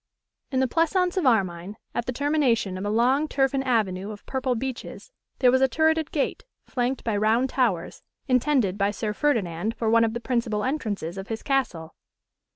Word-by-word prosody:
In 260 -2 0
the 260 - +2
pleasaunce 350 +5 +1
of 360 -8 +1
Armine, 190 -4 +1 0.2
at 240 - -3
the - - 0
termination 255 -8 +1
of 185 - -5
a 205 - -1
long 255 +7 +2
turfen 270 -1 +1
avenue 205 -6 0
of 210 -1 -9
purple 260 -1 -1
beeches, 260 - -6 0.3
there 250 -2 +5
was 260 +1 +3
a 265 - +5
turreted 315 +3 +1
gate, 285 - -2 0.2
flanked 250 +1 -2
by 225 -3 -1
round 225 +5 +2
towers, 220 -11 0 0.3
intended 250 -6 +2
by 200 0 +2
Sir 210 +1 -3
Ferdinand 215 - 0
for 225 -1 0
one 230 0 +5
of 225 0 0
the - - -2
principal 235 -4 -1
entrances 210 - -3
of 195 - -7
his 225 -1 -5
castle. 180 - -1
240 Hz, 180 wpm, -25 LUFS, 210-270 Hz, 0.3 s, there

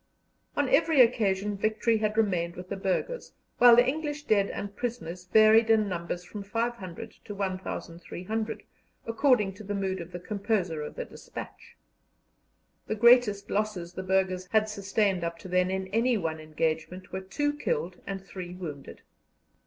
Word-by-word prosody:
On 290 -1 +2
every 320 +1 +3
occasion 210 -4 +3
victory 215 +2 +1
had 215 0 -1
remained 180 -6 +1
with 180 +1 -9
the 200 - -2
burghers, 195 - -2 0.3
while 245 -1 +9
the 245 +1 +6
English 295 +1 -2
dead 205 -7 +2
and 200 0 -5
prisoners 185 -8 -4
varied 220 +3 +6
in 220 -2 +4
numbers 175 -1 -4
from 205 +3 -8
500 225 -1 -4
to 205 - -7
1,300, 190 +2 -4 0.4
according 230 -4 +2
to 205 +3 -11
the 205 0 -3
mood 190 -2 -2
of 170 +1 -9
the 175 - -6
composer 195 -4 -1
of 150 - -6
the - - -4
despatch. - - -10 1.1
The 215 - -1
greatest 235 -3 +5
losses 200 -5 -2
the 185 - -5
burghers 185 -1 0
had 220 -1 +3
sustained 200 -2 0
up 170 0 -3
to 175 - -10
then 180 0 +2
in 190 0 -2
any 230 +4 +2
one 160 -4 -2
engagement 160 +3 -3
were 190 - -3
two 290 +11 -1
killed 465 +11 -2
and 195 -1 -5
three 180 -2 -7
wounded. 150 -7 -8
200 Hz, 160 wpm, -28 LUFS, 180-225 Hz, 1.1 s, while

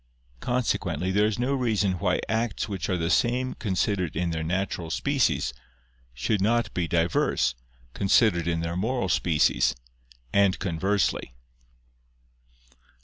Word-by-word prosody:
Consequently 120 - -1
there 105 +2 +3
is 110 - -2
no 125 +3 0
reason 105 -8 0
why - - +1
acts 110 0 -1
which 100 -4 -4
are 90 - +1
the 85 0 -1
same 125 +2 +1
considered 95 -4 -1
in 85 +1 -1
their 80 -1 -2
natural 90 0 -2
species, 85 - 0 0.6
should 65 - -1
not 120 +4 +1
be 90 -2 -1
diverse, 80 -6 +1 0.4
considered 95 -4 +3
in 85 -1 0
their 85 +1 -3
moral 110 +1 -1
species, 80 -4 +2 0.6
and 100 -2 +3
conversely. 90 -6 -1
95 Hz, 125 wpm, -26 LUFS, 85-110 Hz, 0.6 s, there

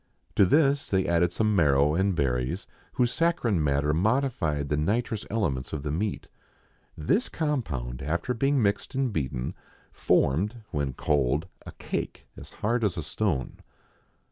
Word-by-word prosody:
To 100 - +5
this 140 - +3
they 95 -1 +2
added'some 85 +5 +2
marrow 75 -3 +4
and 95 +2 +1
berries, 65 - -1 0.3
whose 125 -1 +1
saccharine 120 - +1
matter 75 +1 +1
modified 90 - +1
the 75 - +1
nitrous 110 +8 -1
elements 80 - -1
of 75 -3 -3
the 75 - -2
meat. 100 +7 -2 0.7
This 195 - +1
compound, 80 - -2
after 85 - -1
being 135 +3 +2
mixed 100 +6 -1
and 130 -4 0
beaten, 65 -6 -2 0.4
formed, 100 - +1
when 70 -5 -1
cold, 70 +2 +1 0.2
a - - -6
cake - - -5
as - - -11
hard 115 +2 -1
as 100 -5 0
a 80 - -2
stone. 85 - -2
85 Hz, 140 wpm, -27 LUFS, 75-115 Hz, 0.7 s, To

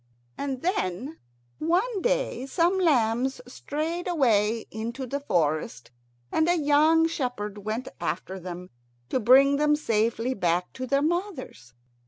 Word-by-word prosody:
And 270 -2 -4
then 300 - -2 0.4
one 375 +7 0
day - - -1
some 350 +5 +2
lambs 255 -6 +2
strayed 315 +7 -4
away 230 - +2
into 230 +5 -5
the 280 +3 -3
forest, 155 - -1 0.4
and 320 +2 +2
a 350 - +3
young 310 +2 +4
shepherd 245 -10 -4
went 215 +5 -4
after 185 +3 -3
them 180 0 -8 0.4
to - - 0
bring 270 +4 +6
them 295 0 +3
safely 230 -2 0
back 180 -4 -1
to 255 0 -5
their 275 +2 +2
mothers. 310 - -3
260 Hz, 130 wpm, -26 LUFS, 215-320 Hz, 0.4 s, bring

